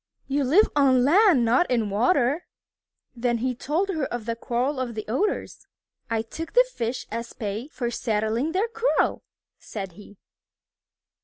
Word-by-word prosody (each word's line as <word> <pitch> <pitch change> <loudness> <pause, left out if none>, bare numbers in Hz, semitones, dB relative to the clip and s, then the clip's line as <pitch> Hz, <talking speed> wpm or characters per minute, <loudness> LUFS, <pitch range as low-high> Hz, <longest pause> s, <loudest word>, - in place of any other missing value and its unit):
You 280 +1 0
live 325 +12 +5
on 265 -3 +4
land, 340 - +5
not 250 +9 +3
in 245 -2 +2
the - - -2
water." 250 - +1 0.7
Then 240 0 0
he 250 +2 -1
told 315 +10 -1
her 315 -7 -1
of 240 -4 -5
the 230 0 -2
quarrel 250 +4 -1
of 245 -3 -3
the 215 - -5
Otters. 375 - -2 0.4
"I 225 -1 0
took 325 +8 -7
the - - +6
fish 235 +2 -3
as 230 +1 -5
pay 215 +4 -4
for 245 -6 -4
settling 225 +5 -1
their 390 +5 +1
quarrel," 460 +2 +1 0.4
said 195 -4 -6
he. 205 +2 -15
250 Hz, 160 wpm, -25 LUFS, 230-310 Hz, 0.7 s, the